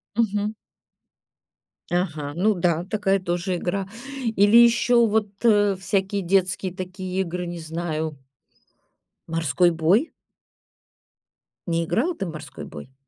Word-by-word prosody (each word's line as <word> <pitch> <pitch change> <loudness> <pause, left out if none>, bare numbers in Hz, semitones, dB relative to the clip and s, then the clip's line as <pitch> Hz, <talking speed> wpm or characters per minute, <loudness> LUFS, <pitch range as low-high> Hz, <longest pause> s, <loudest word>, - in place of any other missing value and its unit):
Мгм. 210 -2 0 1.4
Ага, 155 -5 -1
ну 210 +5 +3
да, 175 -1 0
такая 195 -1 +1
тоже 180 0 -2
игра. 190 +2 -2 0.5
Или 205 +3 +6
еще 235 0 +5
вот, 215 0 +1 0.2
э, 205 -3 +4
всякие 195 +1 -1
детские 185 0 +1
такие 185 0 -5
игры, 180 0 -3
не 175 0 -6
знаю. 160 -2 -3 1.1
Морской 165 +1 +2
бой? 175 - +2 1.6
Не 165 0 +1
играла 240 - 0
ты 195 - -4
в 170 - -5
"морской 155 - -9
бой"? 130 - -11
185 Hz, 115 wpm, -24 LUFS, 170-205 Hz, 1.6 s, Или